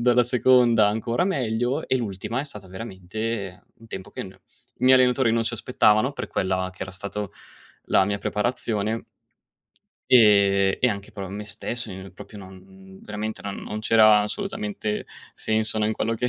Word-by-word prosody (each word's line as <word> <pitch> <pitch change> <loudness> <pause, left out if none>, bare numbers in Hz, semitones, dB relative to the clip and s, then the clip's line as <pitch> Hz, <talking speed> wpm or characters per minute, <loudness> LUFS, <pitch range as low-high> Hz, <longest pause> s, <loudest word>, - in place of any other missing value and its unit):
dalla 125 0 +5
seconda, 120 -3 +4
ancora 115 +9 0
meglio 125 - -1
e - - +2
l'ultima 115 +1 -3
è 145 - -4
stata, 105 -9 -10
veramente, 100 0 -5
un 115 - -17
tempo 100 -1 -8
che - - -6
no 95 0 -12 0.4
i - - 0
miei 130 0 +7
allenatori 125 -1 +3
non 115 0 +1
si 115 - -2
aspettavano 115 +1 +2
per - - -5
quella 95 -1 -1
che - - -7
era 95 - -6
stata 100 +2 -5 0.6
la 95 - +4
mia 100 +1 -2
preparazione 110 0 -2 1.0
ehm, 100 -5 +5
e 125 - +4
anche 100 -2 -5
però 95 -2 -6
me 105 +2 -6
stesso, 120 +4 -4
io 95 +1 -9
proprio 105 - -12
non 95 0 -14
veramente 105 +1 -5
non 100 -1 -5
non 105 0 -5
c'era 110 -1 +6
assolutamente 195 - -4 0.3
senso, 110 0 0
no, 105 - +2
in 110 - 0
quello 115 +1 -1
che 125 +2 -1
110 Hz, 170 wpm, -24 LUFS, 100-120 Hz, 1.0 s, miei